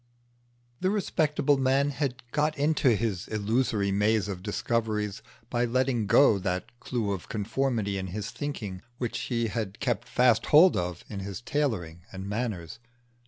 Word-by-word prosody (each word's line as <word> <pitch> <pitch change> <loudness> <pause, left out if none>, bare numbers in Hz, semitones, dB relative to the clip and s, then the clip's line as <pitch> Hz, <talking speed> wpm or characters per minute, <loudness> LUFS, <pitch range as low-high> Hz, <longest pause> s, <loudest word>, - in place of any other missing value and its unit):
The 185 - +1
respectable 150 -8 +1
man 135 +2 +2
had 140 -2 -3
got 150 +1 +1
into 140 -4 +3
his 100 -4 -2
illusory 110 -1 0
maze 105 +1 +2
of 95 -3 -5
discoveries 105 0 -1 0.3
by 120 0 +2
letting 120 -2 +1
go 105 -2 +5
that 95 +6 -3
clue 115 -6 -2
of 95 -3 -5
conformity 110 -2 -1
in 95 - -4
his 105 +4 -5
thinking 110 -11 -5 0.2
which 120 -2 -3
he 115 -2 -1
had 105 -3 -4
kept - - -1
fast 125 -3 +3
hold 170 +5 +7
of 90 -1 -3
in 100 - -6
his 95 -1 -5
tailoring 110 - -2
and 95 +1 -6
manners. 105 -5 -3
115 Hz, 150 wpm, -28 LUFS, 100-130 Hz, 0.3 s, hold